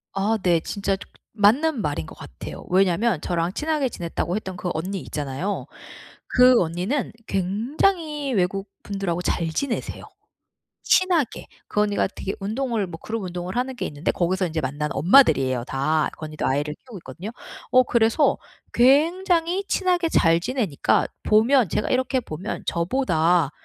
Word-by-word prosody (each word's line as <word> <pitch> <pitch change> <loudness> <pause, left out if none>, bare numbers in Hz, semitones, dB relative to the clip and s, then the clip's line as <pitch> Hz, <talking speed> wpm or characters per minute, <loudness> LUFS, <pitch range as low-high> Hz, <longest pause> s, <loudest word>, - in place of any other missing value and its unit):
아 205 +3 +1
네. 175 -2 +3
진짜 195 +3 -2
조 - - -12 0.3
맞는 235 +7 +3
말인 145 - -2
것 - - -12
같아요. - - -9
왜냐면 190 0 +2
저랑 175 +1 -1
친하게 305 -1 0
지냈다고 175 -4 -3
했던 190 -4 -5
그 180 - -3
언니 185 +5 -3
있잖아요. 150 +6 -4 0.6
그 250 -1 +5
언니는 180 - -2
굉장히 285 - 0
외국분들하고 195 -1 -2
잘 170 -2 -1
지내세요. 235 - -3 0.8
친하게. 355 - +2 0.2
그 210 - 0
언니가 205 -2 +1
되게 195 0 -5
운동을 220 +1 -1
뭐 165 -1 -8
그룹 225 0 -4
운동을 180 +1 -5
하는 255 +1 -1
게 - - -3
있는데 145 +2 -2
거기서 185 +2 0
이제 160 0 -2
만난 145 +2 -3
엄마들이에요, 135 - +4
다. 150 +4 0
그 155 - -7
언니도 155 0 -6
아이를 145 +3 0
키우고 235 +3 -12
있거든요. 170 +7 -8 0.4
어 255 0 +6
그래서 235 +5 +3 0.4
굉장히 335 - +3
친하게 360 -3 +1
잘 165 - +3
지내니까 210 - 0 0.2
보면 230 +2 +4
제가 210 - -1
이렇게 260 +1 +1
보면 185 0 -6
저보다 170 - +1
200 Hz, 330 characters per minute, -23 LUFS, 170-255 Hz, 0.8 s, 어